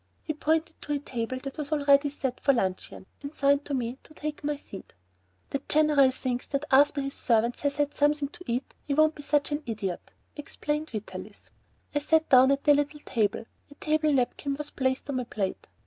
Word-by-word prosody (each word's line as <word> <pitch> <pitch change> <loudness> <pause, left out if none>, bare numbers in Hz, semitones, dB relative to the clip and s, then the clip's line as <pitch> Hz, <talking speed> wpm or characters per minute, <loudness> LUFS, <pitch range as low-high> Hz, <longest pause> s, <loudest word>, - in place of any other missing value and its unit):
He 310 - -2
pointed 320 +2 -1
to 295 - -2
a - - +1
table 255 -2 -4
that 275 +2 -6
was 295 0 -3
already 285 -1 +4
set 265 -3 -4
for 275 - +3
luncheon, 190 -5 -2 0.2
and 285 +2 -7
signed 280 +1 +2
to 285 - -2
me 245 +1 -3
to 310 - -18
take 300 -1 -5
my 295 0 0
seat. 205 -8 -12 0.6
"The 275 - -1
General 300 -3 +5
thinks 255 -1 -3
that 280 +1 -2
after 285 +2 +5
his 275 0 -4
servant 235 0 +1
has 280 0 -1
had 290 -1 0
something 295 -1 +1
to 350 +4 -12
eat 245 +3 -2
he 280 - -2
won't 310 +1 +4
be 295 - -10
such 290 0 +1
an 290 +1 -1
idiot," 200 -6 -4 0.3
explained 300 +1 -3
Vitalis. 215 -2 -8 0.4
I 290 - +2
sat 320 +2 +2
down 260 0 +7
at 275 0 +1
the 295 - +6
little 290 +1 -1
table; 220 -3 -1 0.2
a 285 - -15
table 310 0 +1
napkin 275 +1 0
was 295 +1 -6
placed 260 +1 -1
on 265 - -1
my 250 - -1
plate. 195 -4 -3
280 Hz, 205 wpm, -27 LUFS, 260-295 Hz, 0.6 s, down